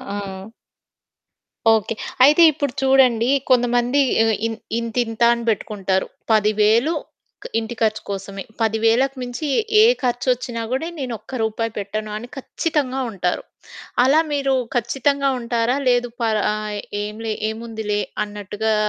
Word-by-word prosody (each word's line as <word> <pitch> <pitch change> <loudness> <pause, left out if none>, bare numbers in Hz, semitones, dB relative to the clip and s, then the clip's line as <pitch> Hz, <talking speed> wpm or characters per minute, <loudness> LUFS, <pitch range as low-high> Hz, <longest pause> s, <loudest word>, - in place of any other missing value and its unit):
ఆ! - - -3 1.6
ఓకే. 220 0 -1 0.3
అయితే 300 +5 +6
ఇప్పుడు 285 -3 -3
చూడండి, 260 -3 +4 0.2
కొంతమంది 245 +2 +3 0.2
ఆహ్, 225 - +2
ఇ - - -3 0.3
ఇంతింత 230 0 -3
అని 235 0 -4
పెట్టుకుంటారు. 195 -3 -1 0.2
10,000 215 +7 +3 0.7
ఇంటి 225 +1 -6
ఖర్చు 215 -1 +1
కోసమే. 195 0 -5 0.2
10,000కు 225 +5 +2
మించి 250 +5 -4 0.3
ఏ - - +8 0.2
ఖర్చొచ్చినా 245 -1 -1
కూడా 270 +6 -1
నేను 255 -3 -3
ఒక్క - - -15
రూపాయి 225 +1 -2
పెట్టను 210 +2 -4
అని 240 +3 -8
ఖచ్చితంగా 270 -2 -2
ఉంటారు. 180 -3 -2 0.6
అలా 275 +5 +5
మీరు 275 -2 +1 0.2
ఖచ్చితంగా 270 +4 +1
ఉంటారా? 235 +1 0
లేదు 245 -1 +2
పర్ 220 -2 +1
ఆహ్, 210 -1 -4 0.2
ఏంలే 215 +1 -4 0.2
ఏముందిలే 220 -2 -3 0.2
అన్నట్టుగా 210 +1 -2
230 Hz, 120 wpm, -21 LUFS, 215-255 Hz, 1.6 s, ఏ